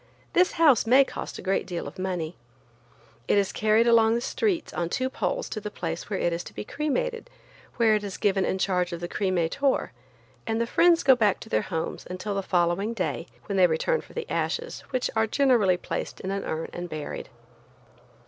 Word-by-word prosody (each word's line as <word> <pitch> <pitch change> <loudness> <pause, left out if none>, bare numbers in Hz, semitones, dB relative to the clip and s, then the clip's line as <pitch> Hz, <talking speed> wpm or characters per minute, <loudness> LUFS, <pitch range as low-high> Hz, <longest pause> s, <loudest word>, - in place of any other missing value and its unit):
This 360 +1 +4
house 290 -9 +4
may 260 +4 +7
cost - - -6
a - - -9
great 195 0 0
deal 175 -2 -4
of - - -10
money. 180 -3 -3 0.9
It - - +3
is 200 -1 +2
carried 215 +2 +3
along 230 -1 +5
the 235 - 0
streets 375 - -1
on 170 -1 -2
two 260 +7 -1
poles - - -2
to 215 - -4
the 210 - -4
place 170 -3 -5
where 200 - -1
it 175 - 0
is 170 - -3
to - - -11
be 105 - -4
cremated 465 - -2 0.5
where 230 -2 +4
it 210 -1 +1
is 200 -2 -5
given 195 -2 +2
in 190 - 0
charge 180 -2 0
of 170 - -4
the 175 - -4
cremator, 185 +8 0 0.6
and 225 0 0
the 235 - +1
friends 335 +7 +4
go 265 -1 +7
back 210 -5 +2
to - - -10
their 110 - +2
homes 165 -3 -4
until 185 +3 -4
the 195 - -1
following 185 +4 0
day, 180 -4 -2 0.2
when 200 - -2
they 185 -1 +6
return 170 - 0
for - - -17
the 475 - -4
ashes, 485 +1 -2
which 255 -1 -1
are 220 0 +2
generally 225 -8 +3
placed - - -5
in 190 - -4
an 195 0 -3
urn 160 +1 -3
and 175 0 -5
buried. 155 -2 -6
205 Hz, 205 wpm, -26 LUFS, 180-255 Hz, 0.9 s, may